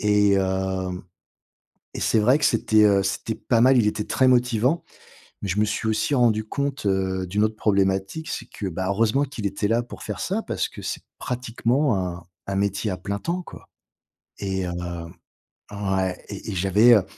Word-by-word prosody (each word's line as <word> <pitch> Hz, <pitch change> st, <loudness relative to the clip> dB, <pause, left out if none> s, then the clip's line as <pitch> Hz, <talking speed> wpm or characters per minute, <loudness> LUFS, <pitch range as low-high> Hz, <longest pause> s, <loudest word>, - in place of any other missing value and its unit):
Et 105 Hz, -1 st, +4 dB
hem, 95 Hz, -1 st, -1 dB, 0.9 s
et -, -, -5 dB
c'est 110 Hz, -, +2 dB
vrai 125 Hz, +6 st, +5 dB
que 150 Hz, -, -1 dB
c'était, 110 Hz, -1 st, +3 dB
heu, 100 Hz, -1 st, +4 dB
c'était 100 Hz, +3 st, -2 dB
pas 115 Hz, -2 st, +1 dB
mal. 130 Hz, 0 st, +6 dB
Il 110 Hz, -, +3 dB
était 105 Hz, 0 st, -2 dB
très 130 Hz, -1 st, +2 dB
motivant, 125 Hz, +4 st, +2 dB, 0.6 s
mais 100 Hz, -, -3 dB
je 100 Hz, +4 st, 0 dB
me 105 Hz, -, +4 dB
suis 110 Hz, +1 st, -2 dB
aussi 110 Hz, +6 st, +1 dB
rendu 110 Hz, -3 st, +3 dB
compte, 140 Hz, -3 st, -3 dB
heu, 95 Hz, -1 st, 0 dB
d'une 105 Hz, +4 st, +1 dB
autre 110 Hz, 0 st, 0 dB
problématique. 95 Hz, +8 st, 0 dB
C'est -, -, -4 dB
que, 100 Hz, -, -5 dB
bah, 95 Hz, +1 st, -3 dB
heureusement 115 Hz, +7 st, +2 dB
qu'il 130 Hz, -6 st, -7 dB
était 100 Hz, +1 st, -1 dB
là 115 Hz, +1 st, +2 dB
pour 120 Hz, -, -10 dB
faire -, -, -5 dB
ça -, -, -1 dB
parce -, -, -2 dB
que -, -, -10 dB
c'est -, -, -4 dB, 0.2 s
pratiquement 125 Hz, 0 st, 0 dB
un 90 Hz, -1 st, -4 dB, 0.2 s
un 100 Hz, -, -2 dB
métier 100 Hz, +1 st, 0 dB
à 90 Hz, -, -3 dB
plein 100 Hz, +2 st, -4 dB
temps, 175 Hz, -, -2 dB
quoi. -, -, -12 dB, 0.7 s
Et 95 Hz, -2 st, -2 dB
heu 90 Hz, -, -3 dB, 1.0 s
ouais, 95 Hz, -2 st, -2 dB
et 100 Hz, +1 st, -7 dB
et 95 Hz, -, -4 dB
j'avais, 100 Hz, +6 st, +5 dB
heu, 100 Hz, -, +4 dB
105 Hz, 190 wpm, -24 LUFS, 95-120 Hz, 1.0 s, mal